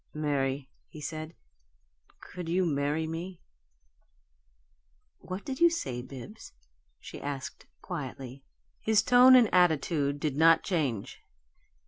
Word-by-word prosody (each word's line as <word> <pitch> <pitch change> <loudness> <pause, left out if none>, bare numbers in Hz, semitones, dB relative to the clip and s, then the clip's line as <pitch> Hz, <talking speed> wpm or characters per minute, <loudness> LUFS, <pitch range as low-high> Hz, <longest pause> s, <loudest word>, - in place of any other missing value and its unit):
"Mary," 140 -2 -1 0.2
he 155 - -12
said, 155 +2 -6 0.8
"could 180 -2 -8
you 180 +2 +1
marry 145 0 -1
me?" 165 +3 -6 1.8
"What 185 +2 -7
did 265 -1 -5
you 340 - +6
say, 130 - -4
Bibbs?" 135 - -11 0.5
she - - -10
asked, 140 -2 -6 0.2
quietly. 135 -6 -7 0.4
His 220 -1 +3
tone 250 +1 +7
and 245 -3 +6
attitude 155 -4 +2
did 145 -2 -2
not 165 +2 +5
change. 140 - -2
155 Hz, 110 wpm, -29 LUFS, 140-185 Hz, 1.8 s, tone